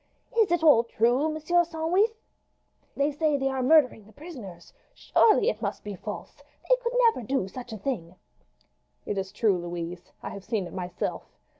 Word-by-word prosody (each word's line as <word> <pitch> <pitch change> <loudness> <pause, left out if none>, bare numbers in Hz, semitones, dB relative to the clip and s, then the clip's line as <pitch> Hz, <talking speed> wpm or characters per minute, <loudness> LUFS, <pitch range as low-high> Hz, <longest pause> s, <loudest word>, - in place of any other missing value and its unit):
"Is 445 -4 +4
it 345 -2 +1
all 290 -8 +7
true, 240 +6 +1
Monsieur 315 +3 +2
Sandwith? 345 +7 +1 0.8
They 280 +1 +2
say 300 0 +1
they 270 0 0
are 265 -1 -2
murdering 255 -5 +4
the 215 - -17
prisoners. 240 - -11 0.2
Surely 435 0 +3
it - - 0
must - - -3
be 205 - -5
false! 210 +3 -8 0.3
They - - +6
could 475 0 -2 0.2
never - - -6
do 240 -3 -1
such 245 +4 -9
a 220 - -5
thing!" 185 -7 -4 0.9
"It 200 - -2
is 190 0 -5
true, 205 -6 +2
Louise. 175 0 -6
I - - -4
have 200 - -8
seen 215 -3 -2
it - - -10
myself. 180 -1 -5
255 Hz, 175 wpm, -27 LUFS, 195-320 Hz, 0.9 s, all